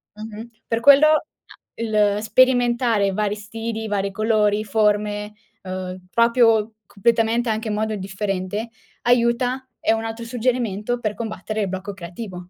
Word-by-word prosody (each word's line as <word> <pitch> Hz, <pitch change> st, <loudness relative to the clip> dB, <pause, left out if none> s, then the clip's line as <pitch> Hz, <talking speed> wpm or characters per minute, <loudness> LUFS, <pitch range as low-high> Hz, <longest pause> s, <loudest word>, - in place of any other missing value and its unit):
Mh-mh. 220 Hz, +2 st, -8 dB, 0.2 s
Per 230 Hz, 0 st, 0 dB
quello 285 Hz, +3 st, +7 dB
a 310 Hz, -1 st, +3 dB, 0.5 s
il 210 Hz, -2 st, +1 dB
sperimentare 240 Hz, -2 st, +3 dB
vari 210 Hz, 0 st, -1 dB
stili, 225 Hz, +1 st, -5 dB
vari 200 Hz, -1 st, -1 dB
colori, 215 Hz, 0 st, +1 dB
forme, 210 Hz, 0 st, 0 dB, 0.3 s
uhm, 185 Hz, 0 st, -6 dB
proprio 230 Hz, -2 st, +3 dB
completamente 230 Hz, +3 st, +1 dB
anche 220 Hz, +1 st, -2 dB
in 210 Hz, -, -1 dB
modo 215 Hz, 0 st, -1 dB
differente 195 Hz, +2 st, -3 dB, 0.3 s
aiuta, 245 Hz, +2 st, +2 dB
è 220 Hz, -, +2 dB
un 225 Hz, 0 st, -2 dB
altro 225 Hz, +1 st, -5 dB
suggerimento 240 Hz, -2 st, -1 dB
per 215 Hz, -3 st, -2 dB
combattere 215 Hz, -1 st, -4 dB
il 200 Hz, -, -1 dB
blocco 190 Hz, +2 st, -5 dB
creativo. 180 Hz, 0 st, -8 dB
220 Hz, 135 wpm, -22 LUFS, 205-235 Hz, 0.5 s, quello